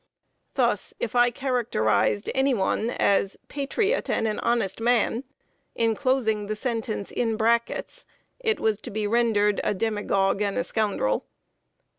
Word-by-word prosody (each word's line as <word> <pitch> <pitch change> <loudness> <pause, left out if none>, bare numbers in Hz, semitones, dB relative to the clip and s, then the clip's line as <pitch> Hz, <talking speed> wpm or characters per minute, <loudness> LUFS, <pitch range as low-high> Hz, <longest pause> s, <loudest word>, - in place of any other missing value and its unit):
Thus, 240 -6 +1
if 235 - -3
I 240 0 +5
characterized 225 - 0
any 265 0 +2
one 215 +2 0
as 200 -4 +1
"patriot 390 - -1
and 225 - +1
an 215 - -2
honest 230 -5 0
man," 240 +2 +2 0.5
inclosing 230 -2 +1
the 215 - -2
sentence 225 -3 -3
in 225 -2 -1
brackets, 235 - 0 0.3
it 445 -3 0
was 220 -2 0
to - - -7
be 215 0 -2
rendered 210 -2 +2
a - - 0
"demagogue 200 -2 0
and 200 -1 0
a 255 - +1
scoundrel." 205 - -1
225 Hz, 135 wpm, -25 LUFS, 205-245 Hz, 0.5 s, I